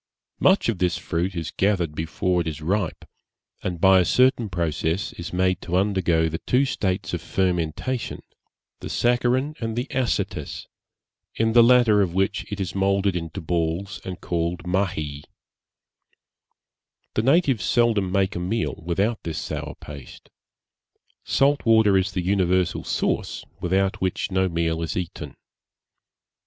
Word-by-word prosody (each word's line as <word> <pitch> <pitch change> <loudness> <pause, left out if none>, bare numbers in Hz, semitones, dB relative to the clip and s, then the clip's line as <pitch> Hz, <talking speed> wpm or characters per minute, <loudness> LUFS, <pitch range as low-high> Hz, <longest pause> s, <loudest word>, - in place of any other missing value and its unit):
Much 190 +2 +4
of 110 -6 -1
this 90 -2 +1
fruit 90 +3 -2
is 85 -2 -4
gathered 95 -6 0
before 80 +3 -1
it 85 - -4
is 75 -2 -4
ripe, 90 +2 -2 0.6
and 90 -2 -3
by 95 +1 +6
a - - +4
certain 125 +1 +3
process 85 +1 -1
is 85 +1 -7
made 90 0 +1
to 90 0 -1
undergo 90 -4 +2
the 80 +1 -3
two 130 +3 +2
states 95 -8 -2
of 85 - -2
fermentation, 90 +8 -1 0.6
the - - -7
saccharine 125 +4 +1
and 115 -1 -3
acetous, 130 -3 -2 0.7
in 115 0 +1
the 120 - +8
latter 115 -3 +5
of 90 -3 -1
which 95 +2 -1
it 105 - -4
is 95 -3 -3
moulded 100 0 +1
into 85 +1 -4
balls, 85 +3 -2
and 90 -1 -7
called 85 0 -2
Mahie. 90 -6 -2 1.9
The - - +1
natives 135 - +3
seldom 110 -6 +2
make 100 +1 +1
a - - -2
meal 95 +4 -2
without 100 +7 0
this 80 -2 -5
sour - - -5
paste. 70 -2 -12 0.9
Salt 140 +1 +2
water 110 -3 +5
is 95 +1 +2
the 90 - -1
universal 90 -2 +1
sauce, - - -2
without 95 +2 0
which 95 +1 -1
no 95 0 +2
meal 85 -1 -1
is 80 -3 -3
eaten. 90 -2 -5
95 Hz, 145 wpm, -24 LUFS, 85-105 Hz, 1.9 s, the